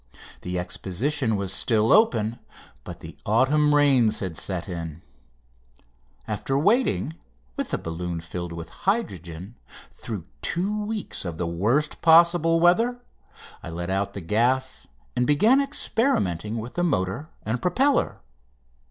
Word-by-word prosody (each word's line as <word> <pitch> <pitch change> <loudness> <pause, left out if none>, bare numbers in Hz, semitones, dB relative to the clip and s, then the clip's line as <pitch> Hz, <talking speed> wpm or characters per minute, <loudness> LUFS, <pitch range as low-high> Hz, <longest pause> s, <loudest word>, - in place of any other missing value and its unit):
The 90 0 -3
Exposition 110 - -1
was 100 -1 -1
still 110 +2 +2
open, 115 - +3 0.4
but - - -9
the - - -10
autumn 145 +7 +3
rains 135 -7 +4
had 95 -4 -4
set 95 +2 -2
in. 85 -3 -6 1.2
After 110 +5 -1
waiting, 160 - +2 0.4
with - - -3
the - - -1
balloon 85 +1 -4
filled 85 +1 -6
with 85 0 -7 0.2
hydrogen, 95 - -3 0.4
through 100 -7 -6 0.2
two 205 +5 -1
weeks 215 -2 -4
of 85 -3 -5
the 85 - -2
worst 110 - 0
possible 165 0 +5
weather 225 +9 +3 0.6
I - - -8
let 85 +2 -4
out 100 +1 -1
the 100 - -5
gas 125 +8 0 0.3
and 125 - +1
began 220 - +5
experimenting 115 - 0
with 115 +2 -6
the 175 - -1
motor 140 - -1
and 115 +3 -2
propeller. 260 +10 +1
115 Hz, 130 wpm, -25 LUFS, -, 1.2 s, possible